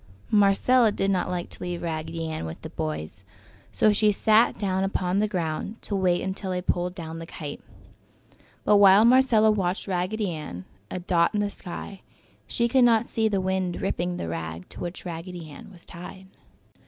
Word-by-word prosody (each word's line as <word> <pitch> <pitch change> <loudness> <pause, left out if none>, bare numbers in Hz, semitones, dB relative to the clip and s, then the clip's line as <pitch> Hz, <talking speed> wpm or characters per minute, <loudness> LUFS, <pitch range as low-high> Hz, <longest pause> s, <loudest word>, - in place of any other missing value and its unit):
Marcella 215 +3 +4
did 195 -1 0
not 185 -2 0
like 175 -1 -3
to - - -9
leave 175 -1 -4
Raggedy 165 0 -3
Ann 155 - -4
with 80 - -9
the - - -7
boys, 80 +4 -5 0.5
so 215 - +3
she 210 0 +3
sat 220 +3 +3
down 190 -2 0
upon 190 -1 0
the 215 - +2
ground 180 +3 -3
to 205 - -3
wait 180 -2 +1
until 190 0 -3
they 180 -1 -1
pulled 180 0 -1
down 165 -1 -7
the 165 - -8
kite. 150 -4 -7 1.0
But 210 - +5
while 200 +2 +7
Marcella 235 -3 +5
watched 190 -2 -1
Raggedy 190 +2 -1
Ann, 95 - -7 0.2
a - - -4
dot 175 +1 +1
in 205 - +2
the 205 0 -1
sky, 190 +2 -8 0.5
she 235 - +1
could 255 +2 +4
not 235 -1 +4
see 220 -1 +1
the 200 -3 0
wind 185 -1 -1
ripping 180 -2 -2
the - - -4
rag 80 +1 -5
to - - -9
which 175 +2 -6
Raggedy 165 -2 -7 0.2
was 180 -3 -15
tied. 180 +2 -10
185 Hz, 180 wpm, -26 LUFS, 170-205 Hz, 1.0 s, while